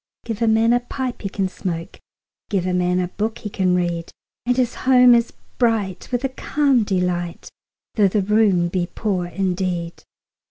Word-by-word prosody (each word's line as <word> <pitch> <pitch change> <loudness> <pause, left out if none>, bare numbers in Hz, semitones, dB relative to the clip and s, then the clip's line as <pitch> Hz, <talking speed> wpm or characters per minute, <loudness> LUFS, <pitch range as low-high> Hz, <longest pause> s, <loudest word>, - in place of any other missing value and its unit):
Give 225 -1 -4
a 230 - +3
man 225 +1 +4
a 245 - +4
pipe 255 0 -5
he 195 - -3
can 195 -1 -1
smoke, 175 -3 -5
5 - - -30 0.5
Give 195 -4 0
a 185 - -1
man 180 0 +1
a 180 -1 -1
book 220 +4 -3
he 210 - -7
can 185 -2 +1
read: 175 -2 -1 0.4
And 245 0 +2
his 250 -2 +1
home 250 -1 +5
is 235 0 +2 0.3
bright 225 -6 0
with 245 +1 -1
a 270 - 0
calm 270 -2 +1
delight, 180 -3 -2 0.4
Though 210 -3 +4
the 200 +1 0
room 200 -4 +3
be 175 0 -1
poor 190 -3 -2
indeed. 180 -1 -2
195 Hz, 185 wpm, -21 LUFS, 180-235 Hz, 0.5 s, home